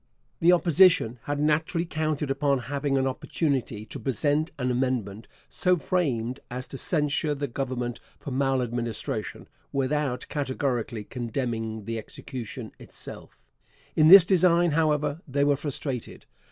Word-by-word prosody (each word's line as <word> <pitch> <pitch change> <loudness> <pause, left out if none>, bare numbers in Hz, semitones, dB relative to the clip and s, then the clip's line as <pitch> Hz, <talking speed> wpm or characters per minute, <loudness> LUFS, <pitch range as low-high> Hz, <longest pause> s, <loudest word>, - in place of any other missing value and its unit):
The 170 +2 +5
Opposition 170 -7 +4
had 145 0 -2
naturally 155 +3 +1
counted 155 -3 -1
upon 140 0 +2 0.2
having 140 -1 0
an 135 - +1
opportunity 130 -4 -2
to - - -8
present 145 - 0
an 125 -2 0
amendment 120 -5 -2 0.2
so 180 -1 +2
framed 135 -8 -1
as 125 +1 -5
to 135 - -6
censure 150 -2 +1
the 145 0 -3
Government 125 -2 -3 0.2
for 140 - -7
maladministration, 125 -3 -2 0.2
without 140 -1 -1
categorically 130 -5 -2
condemning 115 -2 -4
the 115 +1 -3
execution 125 +1 -7
itself. - - -9 0.6
In 155 - +5
this 185 0 +11
design, 175 -2 +4
however, 150 0 +1
they 140 +1 +1
were 145 0 +4
frustrated. 140 -3 -5
140 Hz, 125 wpm, -26 LUFS, 125-150 Hz, 0.6 s, this